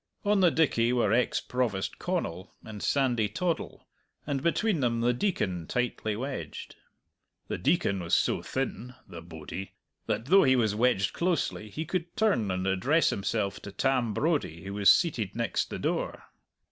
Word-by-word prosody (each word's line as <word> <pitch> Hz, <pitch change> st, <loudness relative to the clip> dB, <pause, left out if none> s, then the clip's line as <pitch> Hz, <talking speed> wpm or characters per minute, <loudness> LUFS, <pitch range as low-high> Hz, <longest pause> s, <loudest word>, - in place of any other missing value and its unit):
On 205 Hz, 0 st, +3 dB
the 180 Hz, -2 st, +6 dB
dickey 125 Hz, -8 st, +2 dB
were 120 Hz, -4 st, +2 dB
ex 125 Hz, +1 st, +2 dB
Provost 120 Hz, -7 st, -2 dB
Connal 130 Hz, -, -3 dB
and 105 Hz, -2 st, -8 dB
Sandy 125 Hz, -6 st, +1 dB
Toddle, 170 Hz, +9 st, -3 dB, 0.4 s
and 140 Hz, -2 st, -2 dB
between 175 Hz, +3 st, +1 dB
them 115 Hz, -3 st, +1 dB
the 120 Hz, +1 st, +3 dB
Deacon, 95 Hz, -, -1 dB
tightly 120 Hz, -3 st, -1 dB
wedged. 130 Hz, +4 st, -6 dB, 0.7 s
The -, -, -3 dB
Deacon 100 Hz, -1 st, +1 dB
was 85 Hz, -2 st, +1 dB
so -, -, +1 dB
thin 125 Hz, -1 st, -4 dB
(the 85 Hz, -, -9 dB
bodie) 85 Hz, +3 st, -8 dB, 0.3 s
that, 115 Hz, -, -1 dB
though 190 Hz, +7 st, +6 dB
he 130 Hz, -5 st, +4 dB
was 110 Hz, -4 st, +2 dB
wedged 110 Hz, -3 st, +2 dB
closely, 170 Hz, -, -1 dB
he 155 Hz, +9 st, -4 dB
could 175 Hz, +1 st, -4 dB
turn 125 Hz, -, +2 dB
and 95 Hz, 0 st, -1 dB
address 125 Hz, -, +2 dB
himself 100 Hz, 0 st, -2 dB
to 100 Hz, -, -9 dB
Tam 125 Hz, +1 st, +1 dB
Brodie, 140 Hz, -, -1 dB
who 100 Hz, 0 st, -6 dB
was 100 Hz, -1 st, +6 dB
seated 115 Hz, -, +1 dB
next 115 Hz, 0 st, -1 dB
the -, -, -4 dB
door. -, -, -2 dB
120 Hz, 160 wpm, -28 LUFS, 100-150 Hz, 0.7 s, the